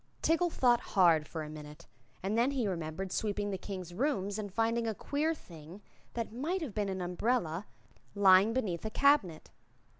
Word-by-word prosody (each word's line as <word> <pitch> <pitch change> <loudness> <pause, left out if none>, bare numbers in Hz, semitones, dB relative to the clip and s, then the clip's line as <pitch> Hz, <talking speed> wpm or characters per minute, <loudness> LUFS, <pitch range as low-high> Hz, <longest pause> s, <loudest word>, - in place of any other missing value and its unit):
Tiggle 340 +2 +3
thought 245 -6 +3
hard 170 -6 +3
for 160 0 -5
a - - -7
minute 150 -1 -10 0.4
and 200 +3 -1
then 235 +3 +3
said 280 - -4
he 245 -5 0
remembered 175 +1 -4
sweeping 205 0 -1
the 190 - -2
King's 185 -4 -7
rooms 205 -3 -1
and 205 -2 -5
finding 230 +2 0
a 220 - -2
queer 305 +8 -1
thing 165 - -12 0.4
that 230 -2 -3
might 325 +10 -2
have 260 -9 -5
been 205 -1 -1
an 190 -1 -3
umbrella 180 0 -1 0.5
lying 195 +1 +6
beneath 210 -9 -2
a 220 - -2
cabinet. 215 - +2
205 Hz, 180 wpm, -32 LUFS, 180-240 Hz, 0.5 s, lying